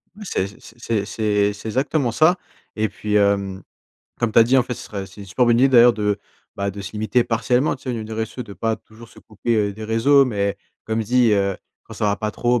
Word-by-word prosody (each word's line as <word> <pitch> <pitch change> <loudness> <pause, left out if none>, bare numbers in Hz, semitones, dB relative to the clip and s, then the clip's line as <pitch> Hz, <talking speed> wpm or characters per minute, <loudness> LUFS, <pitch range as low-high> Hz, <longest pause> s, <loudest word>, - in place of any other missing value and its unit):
Oui, 210 - -10
c'est 95 - -1
c'est 115 -3 -4
c'est 105 -2 0
c'est 100 +2 -9
exactement 130 +2 0
ça. 160 +8 +4 0.4
Et 110 0 0
puis, 105 +1 -3
hem, 100 -2 +1 0.6
comme 120 -2 0
tu - - +5
as - - +9
dit, 125 +4 +3
en 130 - +5
fait, 125 0 -5
ce - - -9
serait 100 -2 -6
c'est 95 +3 -14
une 100 - -9
super 125 +7 +1
bonne 120 0 +4
idée 135 +2 +5
d'ailleurs, 120 -2 +7
de, 105 -2 -1 0.4
bah, 100 0 -1
de 100 +1 -8
se 100 - -7
limiter 110 +3 +1
partiellement, 125 +4 +1
tu - - -22
sais, 130 - -2
au - - -2
niveau 115 -2 -4
des 110 - -8
réseaux 110 0 -2
sociaux, 125 - -7
de 105 - -11
pas 110 +2 -1
toujours 110 +1 -16
se - - -18
couper 110 -1 -1
des 110 +2 -8
réseaux. 125 +6 +4
Mais 100 -5 -1 0.3
comme 110 +1 -1
je 110 - -4
dis, 125 0 +3
heu, 100 -2 +1 0.3
quand - - -11
ça - - -3
va 100 0 +1
pas 110 0 -3
trop, 120 +2 +1
110 Hz, 255 wpm, -21 LUFS, 105-120 Hz, 0.6 s, as